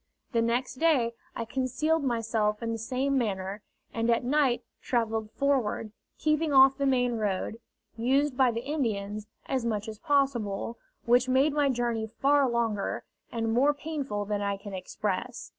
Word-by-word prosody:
The 230 -3 +2
next 245 +3 -1
day 275 -8 +3 0.2
I 230 - -3
concealed 270 +6 0
myself 225 -3 0
in 230 - -1
the 225 - -3
same 265 +4 0
manner, 195 -2 -2 0.3
and 230 0 0
at 230 0 +3
night 265 -1 +2 0.2
travelled 225 -3 -1
forward, 245 -4 0 0.3
keeping 305 0 +1
off 270 0 +6
the 280 - +2
main 250 -3 +2
road, 210 +1 -2 0.4
used 265 +4 +1
by 260 -1 +4
the 230 +1 -3
Indians, 215 -8 -2 0.2
as 260 -3 -1
much 220 -2 -1
as 215 -1 -7
possible, 240 -7 0 0.3
which 245 +2 +4
made 270 +3 +3
my 290 -1 +2
journey 235 -3 -1
far 275 +4 +2
longer, 230 -4 -1 0.3
and 225 -1 -1
more 280 +5 +4
painful 280 -9 -3
than 205 0 -2
I 200 -1 -1
can 200 0 -9
express. 205 +5 -4
235 Hz, 160 wpm, -28 LUFS, 220-270 Hz, 0.4 s, off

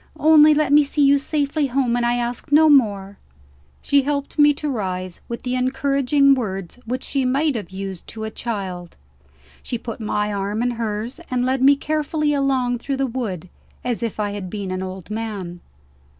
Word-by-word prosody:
Only 305 0 +7
let 295 -2 +2
me 295 0 +7
see 285 0 +1
you 280 0 +5
safely 290 0 -1
home, 255 -2 0
and 240 - 0
I 240 0 +2
ask 240 +4 -3
no 310 +2 +6
more." 205 -7 +2 0.6
She 280 0 +4
helped 280 +2 -3
me 295 0 +7
to 300 - -4
rise, 185 -8 -4
with 235 - -6
the 250 - -2
encouraging 275 +2 +2
words 195 -5 -4
which 250 +2 -3
she 275 -2 -1
might 275 +3 +1
have 215 - -5
used 190 -1 -7
to 220 -1 -6
a 220 - -4
child. 190 -8 -5 0.7
She 240 - -4
put 230 0 -7
my 210 -1 -1
arm 200 +3 -2
in 245 - +1
hers, 230 +4 -4
and 250 -1 0
led 260 0 0
me 280 +2 +6
carefully 305 +1 -1
along 260 -3 +1
through 275 +3 -3
the 270 - +1
wood, 225 -9 -4 0.4
as 245 -2 -2
if 230 -2 -3
I 205 -1 -1
had 200 -2 -6
been 200 -1 -5
an 185 0 -3
old 190 +1 -7
man. 205 -6 -5
245 Hz, 190 wpm, -21 LUFS, 205-280 Hz, 0.7 s, Only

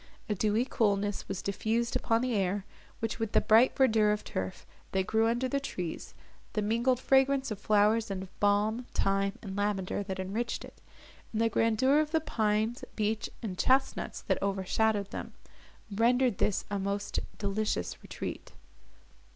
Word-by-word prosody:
A 210 - 0
dewy 215 +4 +1
coolness 205 -5 0
was 190 - -4
diffused 225 +4 -1
upon 225 0 +2
the 255 -1 0
air, 195 -1 0 0.4
which, 225 0 -2
with 225 -2 -2
the - - +6
bright 225 +4 +5
verdure 220 -5 +4
of 210 0 -1
turf, 95 0 -5 0.3
that 190 -1 +1
grew 220 +2 +2
under 240 +3 +1
the 275 +2 0
trees, 180 -11 -5 0.4
the 215 - 0
mingled 235 +4 +2
fragrance 270 -1 +3
of 210 - -4
flowers 215 +2 +3
and 190 -1 -3
of 190 - -15
balm, 210 +4 +2
thyme, 195 0 +1
and 195 -3 -6
lavender, 205 -1 -1
that 195 -1 -4
enriched 210 +6 -3
it, - - -16 0.5
and 220 - -2
the 230 0 +3
grandeur 230 +6 +3
of 305 -1 +1
the 320 +1 +2
pines, 220 -5 0
beech, 215 0 -1
and 185 -5 -4
chestnuts, 265 +1 +1
that - - -1
overshadowed 200 +1 0
them, - - -6 0.6
rendered 240 +1 +3
this 205 - +1
a 200 - 0
most 200 +1 -2 0.2
delicious 200 - -2
retreat. - - -7
215 Hz, 160 wpm, -30 LUFS, 200-235 Hz, 0.6 s, the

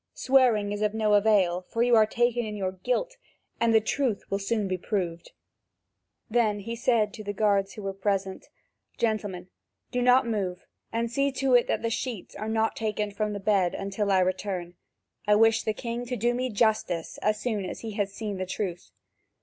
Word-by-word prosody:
Swearing 245 -6 +3
is 205 0 -3
of 210 0 0
no 215 -1 +2
avail, 200 -4 +3
for 230 - +1
you 240 -1 +4
are 215 -1 +6
taken 240 +1 +1
in 215 -1 -5
your 190 -2 -2
guilt, 250 - -2 0.4
and 230 0 +3
the 220 - +6
truth 225 -1 -1
will 195 - 0
soon 205 0 -1
be 185 - -1
proved." 175 -3 -3 1.0
Then 215 -3 +1
he 230 +3 -5
said 230 -3 +1
to 215 - -8
the 205 0 -4
guards 200 -1 +1
who 210 - -9
were 195 0 -3
present: 195 -1 -2 0.5
"Gentlemen, 205 -5 -2 0.4
do 245 - 0
not 250 +1 +5
move, 195 -6 -3 0.3
and 230 0 -1
see 275 +3 +1
to 265 -1 +1
it 245 -1 +5
that - - -1
the 230 - 0
sheets 230 -3 -4
are 215 +2 -4
not 220 0 +1
taken 210 -1 -2
from 210 +1 -2
the 205 - -4
bed 195 -3 +2
until 200 +1 -2
I 190 -1 +4
return. 185 -1 -2 0.5
I 210 - +5
wish 225 +1 +4
the 220 - -1
king 235 +2 -5
to 250 - -2
do 240 +1 +1
me 255 +1 -1
justice, 215 -6 0
as 210 0 0
soon 220 -5 -2
as 185 - -6
he 225 - -5
has 200 -1 -2
seen 205 -1 -5
the 185 0 -3
truth." 180 - -4
215 Hz, 200 wpm, -27 LUFS, 195-230 Hz, 1.0 s, are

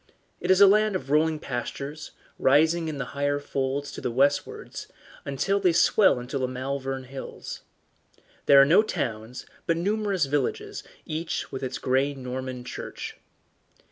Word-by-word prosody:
It - - -4
is 185 0 +6
a 200 - +10
land 210 +1 +4
of 140 -7 -4
rolling 155 +1 +3
pastures, 140 +2 -5 0.3
rising 160 +5 +4
in 150 -3 -4
higher 140 +2 -1
folds 140 0 -2
to - - -8
the - - -1
westwards, 140 +4 0 0.4
until 175 +9 0
they 180 -3 +3
swell 190 - +4
into 125 +3 -4
the 130 - 0
Malvern 135 +1 -3
Hills. 130 +1 -8 0.9
There 140 -1 +8
are 135 - +8
no 175 +9 +6
towns, 125 - -4 0.2
but 165 - +2
numerous 200 -1 0
villages, 140 -2 -2 0.2
each 160 +1 -3
with 135 - -5
its 130 -1 -3
grey 135 +2 +1
Norman 130 -1 -5
church. 125 - -7
140 Hz, 145 wpm, -26 LUFS, 130-165 Hz, 0.9 s, a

